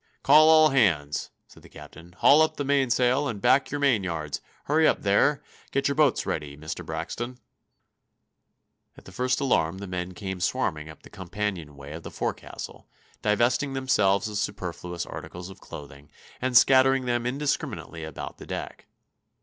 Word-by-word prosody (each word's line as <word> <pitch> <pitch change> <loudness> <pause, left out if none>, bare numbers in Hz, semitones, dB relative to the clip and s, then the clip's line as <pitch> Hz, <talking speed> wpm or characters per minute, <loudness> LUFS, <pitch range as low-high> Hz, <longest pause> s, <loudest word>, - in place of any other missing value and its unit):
"Call 155 +3 +7
all 155 -1 +7
hands!" 85 - +1 0.2
said - - -18
the - - -16
captain. 85 +2 -13
"Haul 150 +2 +6
up 160 - +1
the 145 - -2
mainsail, 135 0 +2
and 110 -6 -4
back 130 +6 +3
your 145 - -3
main 130 -8 +2
yards. 80 -5 -4 0.2
Hurry 155 +2 +3
up - - +1
there! 105 +9 +2 0.3
Get 140 - 0
your 140 - +1
boats 150 -3 +2
ready, 75 -2 -4
Mr. 80 +3 -6
Braxton!" 85 +10 -5 1.6
At - - -16
the - - -12
first 125 +5 0
alarm 95 - +1
the 100 - -7
men 90 -1 -5
came 95 -1 -5
swarming 80 -2 -1
up 80 - -13
the - - -15
companionway 90 -7 -5
of 80 - -7
the - - -8
forecastle, - - -6 0.3
divesting 120 +6 +1
themselves 105 -7 +2
of 105 -1 -3
superfluous 90 -4 -4
articles 90 +2 -8
of - - -15
clothing, 70 -2 -11 0.3
and 125 -1 +3
scattering 135 +1 +5
them 120 -1 0
indiscriminately 135 - -3
about 80 -4 -7
the - - -11
deck. - - -6
105 Hz, 160 wpm, -26 LUFS, 85-135 Hz, 1.6 s, Call